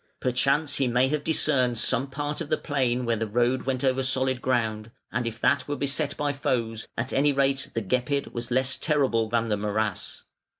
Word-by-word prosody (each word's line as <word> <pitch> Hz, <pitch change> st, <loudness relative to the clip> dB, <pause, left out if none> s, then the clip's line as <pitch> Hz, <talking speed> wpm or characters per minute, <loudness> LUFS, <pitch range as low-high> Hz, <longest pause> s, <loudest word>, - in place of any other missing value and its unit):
Perchance 135 Hz, +4 st, +1 dB
he 135 Hz, -, +1 dB
may 125 Hz, +2 st, +2 dB
have 150 Hz, 0 st, -1 dB
discerned 130 Hz, -6 st, +2 dB
some 125 Hz, +4 st, +1 dB
part 145 Hz, +3 st, -3 dB
of 155 Hz, -, -5 dB
the 155 Hz, -, +2 dB
plain 125 Hz, -4 st, 0 dB
where 115 Hz, 0 st, +1 dB
the 115 Hz, +1 st, -2 dB
road 120 Hz, +4 st, +1 dB
went 130 Hz, -1 st, -1 dB
over 130 Hz, 0 st, +2 dB
solid 130 Hz, -1 st, 0 dB
ground, 110 Hz, -4 st, -1 dB, 0.2 s
and 120 Hz, +1 st, -1 dB
if 115 Hz, 0 st, -5 dB
that 130 Hz, +1 st, +2 dB
were 145 Hz, -, -2 dB
beset 140 Hz, +1 st, 0 dB
by 145 Hz, -1 st, 0 dB
foes, 115 Hz, -5 st, -2 dB
at 120 Hz, +4 st, -2 dB
any 145 Hz, +2 st, +3 dB
rate 135 Hz, 0 st, +1 dB
the 115 Hz, -, 0 dB
Gepid 130 Hz, +7 st, -1 dB
was 120 Hz, 0 st, -2 dB
less 130 Hz, +2 st, +1 dB
terrible 130 Hz, -8 st, +1 dB
than 115 Hz, 0 st, 0 dB
the 105 Hz, -, +1 dB
morass. 105 Hz, -1 st, -2 dB
130 Hz, 200 wpm, -26 LUFS, 115-140 Hz, 0.2 s, any